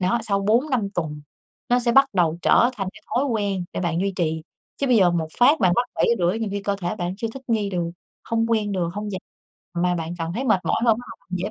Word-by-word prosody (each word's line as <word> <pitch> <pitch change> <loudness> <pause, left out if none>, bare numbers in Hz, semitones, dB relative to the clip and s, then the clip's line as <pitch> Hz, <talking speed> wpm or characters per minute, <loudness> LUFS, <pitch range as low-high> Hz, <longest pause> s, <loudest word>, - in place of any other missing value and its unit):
đó, 190 +6 +2
sau 200 -3 0
4-5 230 +2 +1
tuần 150 -3 -3 0.5
nó 245 +1 +4
sẽ 235 -1 +1
bắt 275 +1 +7
đầu 170 -3 +2
trở 240 - +5
thành 195 -3 -2
cái - - -16
thói 260 - 0
quen 205 -8 -1
để - - -3
bạn 170 -1 0
duy 195 +1 0
trì. 160 -2 -1 0.3
Chứ 280 - -1
bây 250 -2 +4
giờ 185 -4 +5
một 165 -2 -1
phát 285 +6 +5
bạn 180 - +4
bắt 245 - +2
7:30, 205 -3 +2
nhiều 225 -2 -2
khi 200 0 -3
cơ 200 0 -1
thể 175 +3 -2
bạn 180 -1 -3
chưa 225 +2 -3
thích 270 - -8
nghi 215 -3 +1
được, 175 -2 -1 0.4
hông 230 0 0
quen 215 -3 +1
được, 180 -3 0
hông 210 0 -4
dậy 190 - -3 0.6
mà 180 +1 +1
bạn 165 0 -4
còn 165 0 -3
thấy 255 - -2
mệt 215 -7 +3
mỏi - - +1
hơn, 225 -2 +4
bắt 245 - -9
đầu - - -33
dễ 190 +4 -3
200 Hz, 255 wpm, -23 LUFS, 175-230 Hz, 0.6 s, bắt